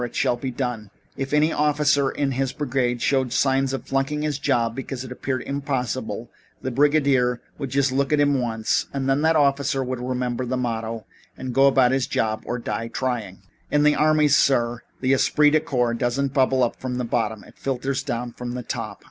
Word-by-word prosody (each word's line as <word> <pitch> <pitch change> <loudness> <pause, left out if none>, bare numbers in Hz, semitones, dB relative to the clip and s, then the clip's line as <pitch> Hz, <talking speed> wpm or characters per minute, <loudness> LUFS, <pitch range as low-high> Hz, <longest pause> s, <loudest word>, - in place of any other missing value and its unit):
It 120 - -5
shall - - +2
be 130 +2 -4
done.' 120 -5 -4 0.3
If 135 0 -4
any 150 +2 +3
officer 150 -2 +2
in 140 0 -1
his 130 0 -1
brigade 125 -3 -1
showed 130 -3 +1
signs 135 0 +2
of 135 - -4
flunking 135 +2 -1
his 150 -2 -1
job 120 -5 +1
because 135 0 -5
it 130 - -9
appeared 130 0 -3
impossible, 140 -4 -3 0.3
the 130 - -4
brigadier 135 -3 +3 0.2
would 135 - -3
just 135 +1 +1
look 135 +2 0
at 150 - +3
him 145 -2 +3
once 110 -2 0
and 135 -1 -2
then 135 +2 +2
that 160 +1 +3
officer 140 -2 +2
would 130 -1 -4
remember 125 0 -2
the 125 +1 -2
motto 115 -2 -3 0.3
and 130 -1 -5
go 135 +2 +5
and 135 - +2
do 130 -1 +5
his 135 -2 +1
job 110 -1 -1
or 120 - -2
die 115 -1 -3
trying. 115 -6 -3 0.3
"In 150 0 +2
the 150 0 +5
army, 155 0 +3
sir, 120 -4 +2 0.2
the 130 +1 +3
esprit 150 +2 +4
de 155 - +4
corps 125 -7 0
doesn't 130 +3 -1
bubble 130 -1 +3
up 120 - -1
from 130 -1 -4
the 125 - -2
bottom. 110 -2 -1
It - - -18
filters 135 0 -2
down 120 -2 -4
from 125 0 -6
the 125 - -4
top. - - -5
130 Hz, 205 wpm, -23 LUFS, 120-140 Hz, 0.3 s, go